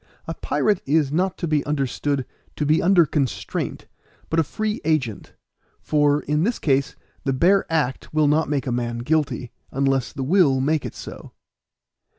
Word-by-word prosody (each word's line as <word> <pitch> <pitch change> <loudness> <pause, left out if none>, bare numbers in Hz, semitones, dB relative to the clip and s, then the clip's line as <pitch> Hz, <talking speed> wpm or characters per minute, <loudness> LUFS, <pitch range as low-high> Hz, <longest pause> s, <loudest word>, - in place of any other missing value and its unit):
A - - -4
pirate 210 -4 0
is 145 -1 +2
not 185 +4 0
to 170 - -3
be 150 -2 +1
understood 140 -1 -1 0.3
to 150 - -1
be 155 +2 +3
under 180 -2 +5
constraint, 140 -4 -2 0.5
but 165 - +2
a - - +4
free 215 +7 -3
agent; 135 - -1 0.5
for, 145 -1 +2
in 150 +2 0
this 230 +7 +1
case, 135 -2 0 0.3
the 135 - 0
bare 180 +8 +3
act 145 -5 -1
will 155 -1 +3
not 150 +1 +2
make 145 -2 -1
a 130 - -2
man 120 -1 -2
guilty, 140 -5 0 0.2
unless 135 -1 0
the 135 - -4
will 145 -3 +3
make 150 +3 0
it - - -10
so. - - -10
150 Hz, 165 wpm, -23 LUFS, 135-160 Hz, 0.5 s, under